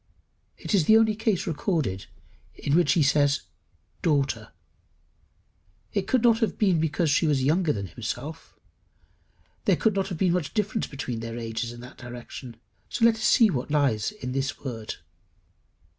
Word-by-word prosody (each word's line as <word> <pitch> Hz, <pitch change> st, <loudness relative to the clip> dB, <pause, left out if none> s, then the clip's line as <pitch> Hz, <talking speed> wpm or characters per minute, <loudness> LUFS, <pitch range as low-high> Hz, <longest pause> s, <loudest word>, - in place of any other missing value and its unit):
It -, -, -4 dB
is 185 Hz, -7 st, +4 dB
the 220 Hz, -, +7 dB
only 220 Hz, -1 st, +4 dB
case 220 Hz, -4 st, 0 dB
recorded 150 Hz, -, -1 dB, 0.5 s
in 145 Hz, -, 0 dB
which 175 Hz, 0 st, +4 dB
he 165 Hz, -, +3 dB
says 145 Hz, 0 st, +3 dB, 0.6 s
Daughter. 135 Hz, -8 st, 0 dB, 1.4 s
It 195 Hz, -2 st, -1 dB
could 255 Hz, -3 st, +2 dB
not 230 Hz, -2 st, +5 dB
have 225 Hz, -, 0 dB
been 190 Hz, -6 st, +3 dB
because 160 Hz, 0 st, +1 dB
she 155 Hz, +3 st, +3 dB
was 140 Hz, -3 st, +2 dB
younger 160 Hz, +3 st, +2 dB
than 100 Hz, -5 st, -3 dB
himself; 125 Hz, -, -7 dB, 1.1 s
there -, -, +4 dB
could 220 Hz, -3 st, +1 dB
not 195 Hz, 0 st, 0 dB
have 180 Hz, -4 st, -5 dB
been 180 Hz, 0 st, +2 dB
much 175 Hz, -1 st, -2 dB
difference 210 Hz, 0 st, 0 dB
between 130 Hz, -4 st, -5 dB
their 115 Hz, 0 st, -5 dB
ages 115 Hz, 0 st, -3 dB
in 120 Hz, 0 st, -10 dB
that 125 Hz, -, -12 dB
direction. 120 Hz, 0 st, -9 dB, 0.4 s
Let 230 Hz, 0 st, +6 dB
us -, -, -8 dB
see 220 Hz, -1 st, +5 dB
what 125 Hz, -3 st, -3 dB
lies 140 Hz, -8 st, +1 dB
in 210 Hz, -12 st, -6 dB
the 135 Hz, +1 st, -1 dB
word. 115 Hz, -4 st, -5 dB
150 Hz, 160 wpm, -26 LUFS, 125-190 Hz, 1.4 s, the